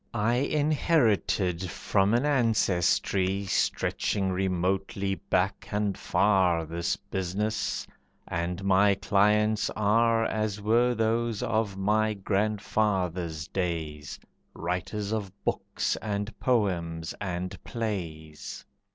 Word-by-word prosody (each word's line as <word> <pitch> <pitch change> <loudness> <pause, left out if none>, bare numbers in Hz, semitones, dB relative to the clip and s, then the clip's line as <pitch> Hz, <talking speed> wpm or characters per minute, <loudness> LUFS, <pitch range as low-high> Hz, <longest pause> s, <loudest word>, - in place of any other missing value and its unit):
I 115 +4 +2
inherited 125 - +1
from 100 +4 +1
an 125 +4 +2
ancestry 100 - +2
Stretching 95 +1 0
remotely 95 +1 -1
back 95 +1 -1
and 105 -2 0
far, 90 -3 +2
This 85 +2 -1
business, 100 +3 -2 0.4
and 85 +2 -3
my 100 +1 +4
clients 105 +2 +2
are 115 +2 +3
As 110 -2 -1
were 120 +4 +3
those 115 0 0
of 110 -3 0
my 105 +2 +1
grandfather's 95 -5 -1
days, 80 -6 -3 0.4
Writers 90 +4 -3
of 105 -4 -2
books, - - -1
and 105 0 -3
poems, 85 -9 0
and 90 -2 -4
plays. 85 -9 -5
100 Hz, 95 wpm, -28 LUFS, 90-110 Hz, 0.4 s, my